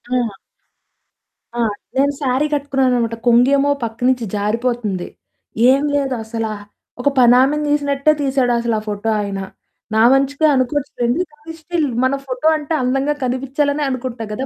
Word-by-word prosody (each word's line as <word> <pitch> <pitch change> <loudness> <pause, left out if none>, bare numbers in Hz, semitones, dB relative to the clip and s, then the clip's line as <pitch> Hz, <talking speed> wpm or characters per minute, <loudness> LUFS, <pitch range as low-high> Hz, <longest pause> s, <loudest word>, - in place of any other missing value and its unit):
ఆ! 225 -6 -1 1.2
ఆ! 240 - -3 0.4
నేను 280 +1 +3
శారీ 265 +2 +1
కట్టుకున్నాననమాట. 260 -5 0
కొంగెమో 275 +4 +4
పక్కనుంచి 235 +2 0
జారిపోతుంది. 210 -2 -1 0.6
ఏమి 280 +2 +2
లేదు 275 -2 0
అసల 225 0 -4 0.6
ఒక 285 - +3
పనామని 260 +5 +4
తీసినట్టే 285 0 +2
తీసాడసల 245 -4 +1
ఆ - - -10
ఫోటో 210 +2 -2
ఆయన. 200 -1 -4 0.6
నా 220 - +4
మంచికె 275 +3 +1
అనుకోవచ్చు 270 +2 -1
లేండి 240 +9 +1
కానీ 300 +2 -11
స్టిల్ 320 -1 -1 0.2
మన 260 +2 +2
ఫోటో 255 +3 -2
అంటె 305 +1 -3
అందంగా 270 +3 +1
కనిపిచ్చాలనే 275 +4 -1
అనుకుంటాం 255 -3 -4
గదా! 260 +6 -3
260 Hz, 130 wpm, -18 LUFS, 235-285 Hz, 1.2 s, కొంగెమో